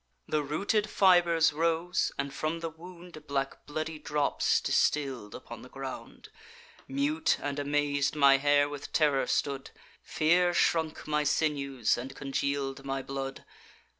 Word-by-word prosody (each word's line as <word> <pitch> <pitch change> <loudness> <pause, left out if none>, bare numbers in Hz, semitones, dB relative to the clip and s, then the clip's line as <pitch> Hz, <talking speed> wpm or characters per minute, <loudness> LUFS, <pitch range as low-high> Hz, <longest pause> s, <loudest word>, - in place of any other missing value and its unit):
The 155 - +1
rooted 200 +9 0
fibers 175 -5 +4
rose, 165 +3 0
and 140 0 -3
from 155 +3 -2
the 165 -1 -4
wound 170 -1 -12
Black 135 -1 -3
bloody 155 +1 -4
drops 150 -1 +1
distill'd 130 -8 0
upon 115 -1 -9
the 125 - -12
ground. 135 0 -8 0.6
Mute 300 +4 +1
and 145 0 -3
amaz'd, 145 0 0
my 140 -2 +6
hair 145 +1 +3
with 145 -1 -8
terror 145 -5 +2
stood; 140 -2 -1 0.3
Fear 175 +3 +2
shrunk 160 -2 +1
my 150 0 +1
sinews, 140 -6 0
and 130 +3 -7
congeal'd 140 0 -2
my 135 -1 -3
blood. 135 0 -5
145 Hz, 135 wpm, -29 LUFS, 135-165 Hz, 0.6 s, my